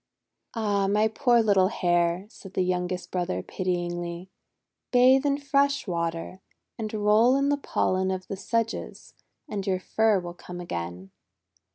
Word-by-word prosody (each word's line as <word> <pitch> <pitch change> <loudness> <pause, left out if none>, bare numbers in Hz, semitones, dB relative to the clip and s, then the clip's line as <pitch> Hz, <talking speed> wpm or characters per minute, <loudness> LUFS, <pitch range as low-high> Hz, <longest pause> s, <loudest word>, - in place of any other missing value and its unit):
"Ah, 205 -3 +1
my 210 +2 +3
poor 235 +1 +3
little 195 -3 +4
Hare!'* 175 -1 +1
said 195 -3 -14
the 185 - +2
youngest 180 0 -2
brother 180 0 -2
pityingly. 175 0 -3 0.6
"Bathe 260 +3 +5
in 280 0 +2
fresh 280 0 +1
water, 170 0 -3 0.3
and 215 -2 -5
roll 215 +4 +4
in 275 +1 +2
the 290 - +2
pollen 190 -8 0
of 185 -1 -3
the 195 - -4
sedges, 230 +4 -3 0.3
and 205 -7 -4
your 185 -1 +1
fur 220 +1 +2
will 175 -1 -7
come 175 0 -9
again." 90 - -6
190 Hz, 145 wpm, -26 LUFS, 175-225 Hz, 0.6 s, Bathe